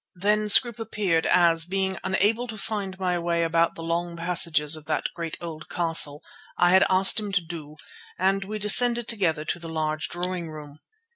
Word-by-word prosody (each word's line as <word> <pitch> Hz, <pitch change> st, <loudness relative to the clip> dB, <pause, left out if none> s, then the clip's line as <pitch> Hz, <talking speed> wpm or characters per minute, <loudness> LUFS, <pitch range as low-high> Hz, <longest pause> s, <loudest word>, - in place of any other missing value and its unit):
Then 210 Hz, +3 st, 0 dB
Scroope 235 Hz, +2 st, +5 dB
appeared, 200 Hz, -7 st, -1 dB
as, 165 Hz, -2 st, +3 dB
being 190 Hz, +1 st, -2 dB
unable 215 Hz, +6 st, 0 dB
to 225 Hz, -2 st, -8 dB
find 200 Hz, -3 st, -4 dB
my 180 Hz, -2 st, -2 dB
way 170 Hz, 0 st, -1 dB
about 165 Hz, 0 st, 0 dB
the 165 Hz, -, -8 dB
long 170 Hz, +1 st, -3 dB
passages 165 Hz, -3 st, +2 dB
of 155 Hz, -1 st, -12 dB
that 155 Hz, -, -2 dB
great 165 Hz, -2 st, -6 dB
old 160 Hz, -2 st, -9 dB
castle, 165 Hz, -4 st, +1 dB, 0.3 s
I 175 Hz, -, +3 dB
had 190 Hz, +1 st, +5 dB
asked 190 Hz, +3 st, +4 dB
him 210 Hz, -2 st, -6 dB
to 195 Hz, -, +1 dB
do, 155 Hz, -3 st, -10 dB, 0.4 s
and 195 Hz, +1 st, 0 dB
we 210 Hz, +2 st, -6 dB
descended 235 Hz, +3 st, +4 dB
together 170 Hz, -9 st, -1 dB
to 175 Hz, -, -4 dB
the 165 Hz, -1 st, -7 dB
large 155 Hz, -1 st, -3 dB
drawing 175 Hz, -1 st, -4 dB
room. 150 Hz, -1 st, -11 dB
175 Hz, 185 wpm, -24 LUFS, 165-195 Hz, 0.4 s, Scroope